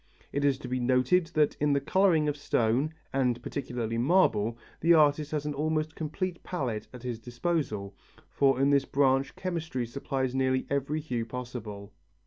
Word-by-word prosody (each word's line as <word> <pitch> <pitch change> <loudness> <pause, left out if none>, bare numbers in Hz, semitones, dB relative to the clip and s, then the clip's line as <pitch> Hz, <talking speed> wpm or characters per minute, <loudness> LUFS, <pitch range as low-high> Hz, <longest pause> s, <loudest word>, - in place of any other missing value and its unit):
It 140 - -1
is 140 -2 +3
to 135 - -8
be 130 0 -1
noted 130 +8 +3
that 150 -1 +3
in 150 0 +2
the 140 - +3
colouring 165 +1 +3
of 145 - 0
stone, 130 0 +1 0.2
and 125 -3 +1
particularly 115 -4 -3
marble, 120 - +3 0.2
the 170 +2 +5
artist 150 -1 +4
has 150 -1 -2
an 150 - -2
almost 155 +2 -1
complete 170 +3 -4
palette 125 - -3
at 125 -1 -11
his 120 -3 -4
disposal, 120 - -2 0.3
for 135 -2 +2
in 140 +1 +4
this 140 -1 +3
branch 135 0 +2
chemistry 165 -9 -3
supplies 130 +1 -2
nearly 130 0 +1
every 140 +3 0
hue 125 -6 -2
possible. 115 -4 -7
135 Hz, 165 wpm, -29 LUFS, 125-155 Hz, 0.3 s, the